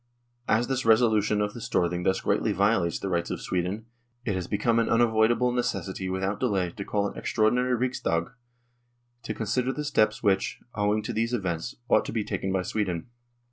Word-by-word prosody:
As 115 Hz, +3 st, +3 dB
this 135 Hz, -1 st, 0 dB
reso 115 Hz, 0 st, +5 dB
lution 105 Hz, 0 st, +2 dB
of 105 Hz, -, -6 dB
the 120 Hz, -, -8 dB
Storthing 90 Hz, -3 st, 0 dB
thus 95 Hz, -, +2 dB
greatly 105 Hz, +1 st, +1 dB
violates 100 Hz, -3 st, +2 dB
the -, -, -4 dB
rights 85 Hz, -2 st, -1 dB
of -, -, -3 dB
Sweden 95 Hz, +5 st, -2 dB, 0.4 s
it 105 Hz, -, 0 dB
has 95 Hz, -2 st, -3 dB
become 115 Hz, +3 st, +1 dB
an 115 Hz, -, +1 dB
unavoidable 115 Hz, +1 st, +3 dB
necessity 120 Hz, -6 st, -2 dB
without 95 Hz, +2 st, -2 dB
delay 95 Hz, -8 st, 0 dB
to 100 Hz, -, -6 dB
call 100 Hz, 0 st, 0 dB
an -, -, -8 dB
extraordinary 125 Hz, +4 st, +1 dB
Riksdag 115 Hz, -9 st, -1 dB, 0.9 s
to -, -, -4 dB
consider 120 Hz, +4 st, 0 dB
the 150 Hz, -, -4 dB
steps 110 Hz, -5 st, +1 dB
which, 100 Hz, -3 st, +1 dB
owing 105 Hz, +1 st, +1 dB
to -, -, -4 dB
these 115 Hz, +2 st, 0 dB
events, 90 Hz, -1 st, -3 dB
ought -, -, +4 dB
to -, -, -4 dB
be 110 Hz, -2 st, 0 dB
taken 95 Hz, -1 st, -3 dB
by 95 Hz, -1 st, 0 dB
Sweden. 95 Hz, -1 st, -2 dB
105 Hz, 185 wpm, -27 LUFS, 95-115 Hz, 0.9 s, reso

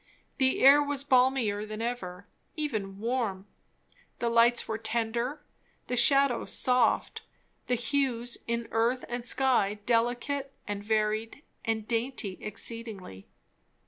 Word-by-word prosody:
The 260 Hz, -1 st, +2 dB
air 280 Hz, +2 st, +8 dB
was 285 Hz, -1 st, -1 dB
balmier 250 Hz, -6 st, +2 dB
than 215 Hz, 0 st, -7 dB
ever, 200 Hz, -6 st, -4 dB, 0.3 s
even 215 Hz, -11 st, -3 dB
warm; 220 Hz, -4 st, -2 dB, 0.7 s
the 235 Hz, -, -1 dB
lights 235 Hz, +1 st, +4 dB
were 220 Hz, 0 st, -3 dB
tender, 235 Hz, +5 st, -2 dB, 0.4 s
the 250 Hz, -, -2 dB
shadows 275 Hz, 0 st, +3 dB
soft; 250 Hz, -2 st, +2 dB, 0.5 s
the 250 Hz, -, +2 dB
hues 245 Hz, -1 st, -1 dB
in 235 Hz, 0 st, -2 dB
earth 235 Hz, +3 st, +1 dB
and 240 Hz, 0 st, -4 dB
sky 245 Hz, -5 st, +2 dB
delicate 245 Hz, +4 st, 0 dB, 0.2 s
and 205 Hz, -1 st, -4 dB
varied 215 Hz, +4 st, -1 dB, 0.2 s
and 220 Hz, -1 st, -2 dB
dainty 230 Hz, -4 st, -1 dB
exceedingly. 215 Hz, -, -6 dB
235 Hz, 115 wpm, -28 LUFS, 220-255 Hz, 0.7 s, air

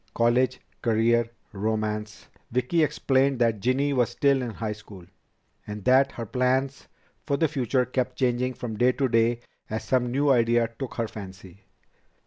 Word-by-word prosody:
"College? 120 Hz, +2 st, +2 dB, 0.2 s
Career? 115 Hz, 0 st, +2 dB, 0.2 s
Romance?" 105 Hz, 0 st, -3 dB, 0.2 s
Vicki 125 Hz, +8 st, +1 dB
explained 140 Hz, -3 st, +2 dB
that 115 Hz, -3 st, +1 dB
Ginny 135 Hz, +6 st, +1 dB
was 120 Hz, -4 st, +2 dB
still 135 Hz, +2 st, +2 dB
in 125 Hz, -, -3 dB
high 110 Hz, 0 st, -4 dB
school, 105 Hz, -4 st, -11 dB, 0.6 s
and 105 Hz, -2 st, -7 dB
that 135 Hz, +2 st, +4 dB
her 115 Hz, -, -5 dB
plans 130 Hz, +4 st, 0 dB, 0.4 s
for 140 Hz, -, +1 dB
the 160 Hz, -, +2 dB
future 130 Hz, -3 st, 0 dB
kept 125 Hz, 0 st, -2 dB
changing 125 Hz, 0 st, 0 dB
from 110 Hz, -3 st, -5 dB
day 125 Hz, +3 st, +3 dB
to 135 Hz, 0 st, 0 dB
day 115 Hz, 0 st, +2 dB, 0.3 s
as 110 Hz, +1 st, -3 dB
some 125 Hz, -2 st, +1 dB
new 140 Hz, +3 st, +2 dB
idea 115 Hz, -2 st, +3 dB
took 135 Hz, -, -5 dB
her 115 Hz, -1 st, -1 dB
fancy. 95 Hz, -3 st, -11 dB
120 Hz, 155 wpm, -26 LUFS, 110-130 Hz, 0.6 s, that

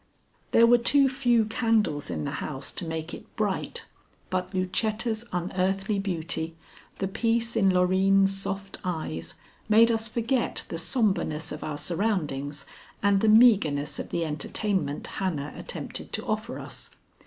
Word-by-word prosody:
There 230 Hz, -, +6 dB
were 240 Hz, +1 st, +6 dB
too 275 Hz, +3 st, +5 dB
few 245 Hz, -4 st, +2 dB
candles 215 Hz, -, +1 dB
in -, -, -3 dB
the 140 Hz, -, -2 dB
house 140 Hz, -3 st, -5 dB
to -, -, -5 dB
make 160 Hz, +1 st, -4 dB
it -, -, -11 dB
bright, -, -, -2 dB, 0.5 s
but 185 Hz, 0 st, -1 dB
Lucetta's 220 Hz, +5 st, 0 dB
unearthly 195 Hz, +3 st, 0 dB
beauty, 165 Hz, -4 st, -3 dB, 0.4 s
the 195 Hz, -, -1 dB
peace 230 Hz, +3 st, 0 dB
in 195 Hz, -4 st, +4 dB
Loreen's 190 Hz, +2 st, +3 dB
soft 195 Hz, 0 st, -4 dB
eyes, 155 Hz, -, -4 dB, 0.3 s
made 225 Hz, +2 st, +6 dB
us 225 Hz, 0 st, 0 dB
forget 235 Hz, +2 st, -1 dB
the 165 Hz, -, -3 dB
sombreness 180 Hz, -, 0 dB
of 150 Hz, -, -6 dB
our 150 Hz, -1 st, -4 dB
surroundings 150 Hz, -6 st, -1 dB, 0.4 s
and 200 Hz, -1 st, +4 dB
the 220 Hz, -, +4 dB
meagreness 205 Hz, -11 st, +5 dB
of -, -, -5 dB
the 170 Hz, -, -1 dB
entertainment 155 Hz, +1 st, -2 dB
Hannah 155 Hz, -7 st, -3 dB
attempted -, -, -7 dB
to -, -, -3 dB
offer -, -, -2 dB
us. -, -, -8 dB
195 Hz, 140 wpm, -27 LUFS, 160-225 Hz, 0.5 s, There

